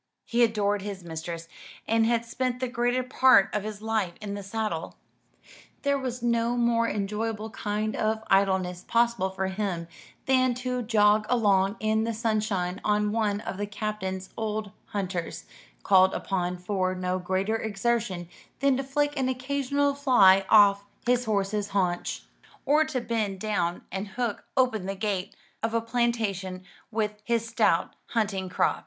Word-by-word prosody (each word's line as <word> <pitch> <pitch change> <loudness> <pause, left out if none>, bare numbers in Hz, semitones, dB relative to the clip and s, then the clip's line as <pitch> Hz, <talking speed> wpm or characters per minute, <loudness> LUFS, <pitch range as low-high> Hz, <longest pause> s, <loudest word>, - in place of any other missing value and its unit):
He 240 +1 +2
adored 205 -3 +1
his 195 -2 -6
mistress, 165 0 -6 0.4
and 225 0 +3
had 235 0 +1
spent 250 +1 -2
the 255 - -1
greater 245 +1 0
part 255 -4 +5
of 210 - 0
his 210 0 -7
life 220 -5 0
in 205 -2 -5
the 200 - -5
saddle. 195 -4 -3 0.9
There 280 -1 +2
was 250 -2 -4
no 235 0 +1
more 235 -1 +2
enjoyable 215 +2 -3
kind 215 0 -2
of 220 0 0
idleness 190 -3 +2
possible 235 -5 +1
for 190 0 -3
him 190 -3 -2 0.4
than 255 -1 +3
to 250 0 -2
jog 215 -2 +3
along 205 -4 +3
in 220 0 +1
the 230 0 -2
sunshine 210 -5 -1
on 210 0 +1
one 210 -2 0
of 195 - -5
the 205 +1 -2
Captain's 195 -2 -4
old 215 -2 -3
hunters; 185 -4 -4 0.4
called 190 0 +5
upon 180 -2 -2
for 185 0 -1
no 185 0 -1
greater 190 +4 0
exertion 215 -4 -1 0.3
than 275 -1 +3
to 270 - -2
flick 290 +2 0
an 260 -1 +1
occasional 280 +2 0
fly 195 -9 +5
off 200 -2 +6 0.2
his 250 0 +2
horse's 205 -1 0
haunch, 180 -4 -1 0.4
or 300 +2 +4
to 290 -5 -2
bend 220 -4 -2
down 185 -4 -1
and 195 +2 -3
hook 230 +1 -3
open 225 -7 +2
the 195 - -2
gate 195 -1 -2 0.3
of 225 0 -1
a - - +4
plantation 225 -6 -1 0.3
with 210 -1 -2
his 230 0 0
stout 225 - +1
hunting 200 -5 -1
crop. - - +1
215 Hz, 155 wpm, -27 LUFS, 195-235 Hz, 0.9 s, off